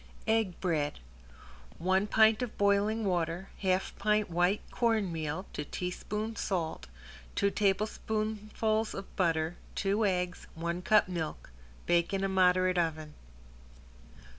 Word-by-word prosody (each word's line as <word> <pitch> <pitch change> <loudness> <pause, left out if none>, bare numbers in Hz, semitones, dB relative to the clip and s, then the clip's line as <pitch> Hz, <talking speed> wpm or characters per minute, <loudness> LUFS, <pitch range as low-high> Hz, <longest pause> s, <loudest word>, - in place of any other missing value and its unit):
~EGG 220 -5 +1
BREAD~ 155 -5 -1 0.8
One 190 +3 +2
pint 220 +2 +5
of 245 -3 -4
boiling 205 +2 +2
water, 175 0 -1
half 185 -1 0
pint 210 -3 +1
white 180 +4 +2
cornmeal 185 -8 0
to 150 - -3
teaspoon 210 +7 -4
salt, 170 -7 -2 0.5
two 200 - +2
tablespoonfuls 215 +2 0
of 195 - -8
butter, 165 -2 +1 0.2
two 200 +3 +1
eggs, 180 -3 -1
one 170 +2 -3
cup 215 +2 +4
milk, 165 - -5 0.3
bake 170 +2 +2
in 195 - -1
a - - +2
moderate 185 -1 +3
oven. 155 -2 -2
190 Hz, 115 wpm, -31 LUFS, 175-215 Hz, 0.8 s, pint